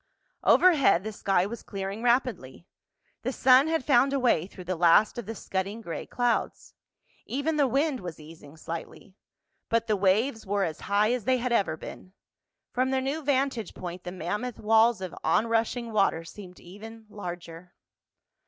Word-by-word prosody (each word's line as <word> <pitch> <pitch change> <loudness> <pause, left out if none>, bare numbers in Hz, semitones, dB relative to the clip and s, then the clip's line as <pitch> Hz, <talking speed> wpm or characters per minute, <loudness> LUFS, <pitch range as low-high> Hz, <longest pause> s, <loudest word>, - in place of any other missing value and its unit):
Overhead 280 - +5
the 220 - -4
sky 195 -3 +1
was 230 +4 -6
clearing 195 +1 -6
rapidly. 235 - 0 0.6
The 255 - -2
sun 260 +2 +5
had 320 -4 -1
found 275 0 +4
a 275 - +1
way 210 -10 +2
through 185 - -11
the 185 +1 -3
last 175 +7 +4
of 225 - -7
the 225 - -5
scudding 195 +2 -4
gray 170 -8 -6
clouds. 245 -1 -1 0.5
Even 285 +5 -1
the 290 -2 +3
wind 275 +2 0
was 175 -5 -8
easing 155 -1 -14
slightly. 170 +4 -8 0.6
But 230 0 +1
the 215 - +1
waves 215 +5 +1
were 200 0 -1
as 160 -4 -3
high 210 +3 +3
as 250 -4 -3
they 260 0 +3
had 250 0 -2
ever 195 -9 +1
been. 185 +3 -10 0.6
From 255 +1 0
their 265 0 +1
new 275 +4 -2
vantage 270 -5 -1
point 180 0 -7
the 180 - -6
mammoth 205 +7 -4
walls 220 0 +3
of 185 - -5
onrushing 230 +1 0
water 195 -6 +1
seemed 180 +1 -12
even 220 +5 -12
larger. 175 -4 -9
215 Hz, 165 wpm, -27 LUFS, 185-250 Hz, 0.6 s, Overhead